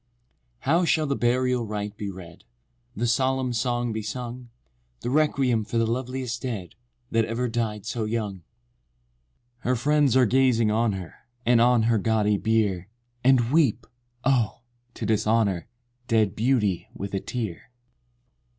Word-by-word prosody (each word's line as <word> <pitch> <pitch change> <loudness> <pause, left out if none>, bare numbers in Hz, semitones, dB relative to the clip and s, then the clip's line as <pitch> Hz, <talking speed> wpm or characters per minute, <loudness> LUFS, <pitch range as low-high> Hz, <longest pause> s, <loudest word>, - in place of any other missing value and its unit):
How 165 +6 +2
shall 160 -2 +2
the 140 -1 0
burial 125 0 +1
rite 105 0 -4
be 105 -1 -5
read? 90 -3 -11 0.5
The 120 - -1
solemn 130 +1 +1
song 120 0 -1
be 110 - -3
sung? 120 +3 -6 0.5
The 120 - -3
requiem 135 -6 +2
for 110 +3 -3
the 115 - +3
loveliest 125 0 -3
dead, 105 -9 -5 0.4
That 115 -1 +2
ever 115 +3 -2
died 110 -3 -2
so 115 0 -2
young? 105 -3 -2
II. - - -19 1.2
Her 125 +2 0
friends 140 +1 +3
are 130 - +6
gazing 120 -2 +3
on 110 0 +2
her, 95 -3 -6 0.3
And 120 0 +5
on 120 -1 +4
her 115 -1 +2
gaudy 105 0 +2
bier, 105 -5 0 0.3
And 125 -2 +4
weep!—oh! 120 -4 0 0.3
to - - -4
dishonor 105 -5 +1 0.4
Dead 110 -5 +2
beauty 105 -8 +1
with 100 0 -6
a 95 - 0
tear! 110 -4 -5
115 Hz, 140 wpm, -25 LUFS, 105-125 Hz, 1.2 s, are